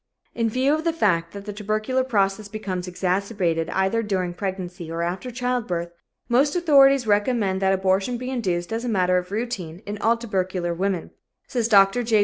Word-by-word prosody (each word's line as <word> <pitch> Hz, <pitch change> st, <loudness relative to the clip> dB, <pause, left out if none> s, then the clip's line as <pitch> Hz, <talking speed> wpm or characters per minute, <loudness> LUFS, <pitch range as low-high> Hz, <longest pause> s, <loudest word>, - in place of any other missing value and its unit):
"In 230 Hz, -1 st, 0 dB
view 260 Hz, +5 st, +2 dB
of 310 Hz, +1 st, -1 dB
the 335 Hz, -1 st, +1 dB
fact 170 Hz, -, +1 dB
that 200 Hz, 0 st, -9 dB
the 210 Hz, -, -5 dB
tubercular 215 Hz, +5 st, -1 dB
process 205 Hz, -4 st, 0 dB
becomes 195 Hz, -4 st, -4 dB
exacerbated 180 Hz, -2 st, -1 dB
either 190 Hz, +4 st, +1 dB
during 190 Hz, -5 st, -1 dB
pregnancy 185 Hz, -2 st, -5 dB
or 165 Hz, +1 st, -2 dB
after 185 Hz, +8 st, -3 dB
childbirth, 235 Hz, -9 st, -2 dB, 0.4 s
most 270 Hz, +5 st, +2 dB
authorities 275 Hz, -6 st, +5 dB
recommend 205 Hz, -2 st, +1 dB
that 190 Hz, 0 st, +3 dB
abortion 195 Hz, +5 st, +1 dB
be 255 Hz, +2 st, -5 dB
induced 185 Hz, -6 st, -2 dB
as 225 Hz, +1 st, -2 dB
a 245 Hz, -, -2 dB
matter 185 Hz, -3 st, +2 dB
of 180 Hz, -, -9 dB
routine 205 Hz, -6 st, -4 dB
in 205 Hz, 0 st, -5 dB
all 230 Hz, +2 st, +2 dB
tubercular 185 Hz, -6 st, -2 dB
women," 185 Hz, 0 st, -2 dB, 0.4 s
says 235 Hz, -3 st, 0 dB
Dr. 200 Hz, +1 st, +5 dB
J. 225 Hz, -2 st, +2 dB
200 Hz, 175 wpm, -23 LUFS, 185-235 Hz, 0.4 s, authorities